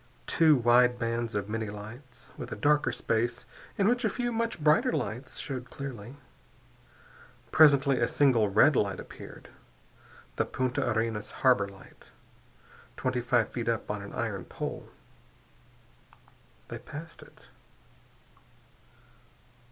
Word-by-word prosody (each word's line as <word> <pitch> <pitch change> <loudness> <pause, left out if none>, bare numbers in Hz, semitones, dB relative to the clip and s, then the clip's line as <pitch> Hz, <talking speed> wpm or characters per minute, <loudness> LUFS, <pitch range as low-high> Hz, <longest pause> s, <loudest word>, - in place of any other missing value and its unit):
Two 160 -2 +4
wide 120 0 +4
bands 115 -1 -2
of 100 -1 -2
many 110 0 -3
lights, 110 +5 -11
with - - -8
a - - -3
darker 150 -3 +2
space 120 +1 -1 0.3
in 200 - +3
which 245 +2 +2
a 220 - +2
few 240 +3 -2
much 230 -4 -2
brighter 150 +1 +3
lights 125 -3 -4
showed 130 -3 -5
clearly. 130 -3 -7 1.4
Presently 140 -4 +5
a 115 - +2
single 120 -8 +3
red 110 +9 +5
light 100 -4 0
appeared, - - -11 0.9
the - - +2
Punta 130 +1 -1
Arenas 110 -1 -1 0.2
harbor 120 -6 +5
light, 100 -1 -16 0.9
twenty 130 -1 -1
five 120 -2 +2
feet 115 -1 -3
up 115 -2 -1
on 105 -1 -4
an 100 - -9
iron - - -3
pole. - - -6 1.8
They - - -6
passed 165 +3 -10
it. - - -17
125 Hz, 125 wpm, -29 LUFS, 110-145 Hz, 1.8 s, Presently